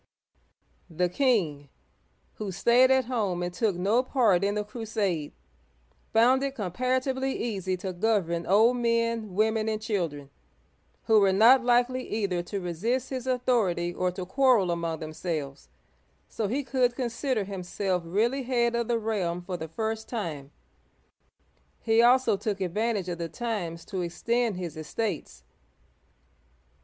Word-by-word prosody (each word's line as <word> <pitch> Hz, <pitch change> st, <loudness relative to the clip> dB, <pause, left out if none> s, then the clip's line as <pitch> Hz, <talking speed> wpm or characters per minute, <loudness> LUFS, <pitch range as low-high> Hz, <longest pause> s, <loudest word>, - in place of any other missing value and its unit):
The 175 Hz, +2 st, 0 dB
king, 175 Hz, -, 0 dB, 0.7 s
who 210 Hz, -3 st, -4 dB
stayed 240 Hz, +7 st, +4 dB
at 265 Hz, -1 st, +3 dB
home 205 Hz, -8 st, -1 dB
and 175 Hz, 0 st, -3 dB
took 205 Hz, 0 st, 0 dB
no 200 Hz, +7 st, +2 dB
part 230 Hz, -8 st, +2 dB
in 200 Hz, +1 st, +1 dB
the 210 Hz, -, -1 dB
crusade, 210 Hz, -8 st, -3 dB, 0.8 s
found 245 Hz, +4 st, +4 dB
it 275 Hz, -1 st, -2 dB
comparatively 260 Hz, +6 st, -1 dB
easy 190 Hz, -5 st, -2 dB
to 185 Hz, 0 st, -5 dB
govern 175 Hz, -4 st, 0 dB
old 225 Hz, +6 st, +4 dB
men, 230 Hz, -4 st, 0 dB
women, 220 Hz, +1 st, +1 dB
and 215 Hz, -1 st, -1 dB
children, 170 Hz, -, -3 dB, 0.7 s
who 220 Hz, -1 st, +5 dB
were 195 Hz, -2 st, +4 dB
not 235 Hz, +7 st, +6 dB
likely 245 Hz, +1 st, +2 dB
either 195 Hz, -5 st, -1 dB
to 195 Hz, +3 st, -5 dB
resist 220 Hz, +10 st, -2 dB
his 260 Hz, -1 st, -4 dB
authority 230 Hz, -9 st, +1 dB
or 180 Hz, +1 st, 0 dB
to 180 Hz, 0 st, -6 dB
quarrel 235 Hz, -3 st, +3 dB
among 170 Hz, -1 st, -2 dB
themselves, 155 Hz, -3 st, -5 dB, 0.6 s
so 215 Hz, -, -3 dB
he 265 Hz, +7 st, -1 dB
could 250 Hz, -1 st, +1 dB
consider 245 Hz, -2 st, -1 dB
himself 190 Hz, -1 st, -2 dB
really 220 Hz, +10 st, 0 dB
head 240 Hz, -2 st, +1 dB
of 235 Hz, -1 st, -1 dB
the 235 Hz, -, +1 dB
realm 190 Hz, -6 st, -2 dB
for 180 Hz, 0 st, -4 dB
the 160 Hz, -2 st, -5 dB
first 220 Hz, +5 st, -4 dB
time. 160 Hz, -, -4 dB, 1.3 s
He 225 Hz, 0 st, +3 dB
also 240 Hz, -3 st, +4 dB
took 200 Hz, -1 st, -3 dB
advantage 200 Hz, +2 st, -1 dB
of 175 Hz, -1 st, -4 dB
the 165 Hz, -1 st, -3 dB
times 185 Hz, -9 st, -4 dB
to 190 Hz, -, -4 dB
extend 220 Hz, +5 st, -1 dB
his 175 Hz, -3 st, -5 dB
estates. 155 Hz, -, -4 dB
210 Hz, 140 wpm, -27 LUFS, 180-240 Hz, 1.3 s, not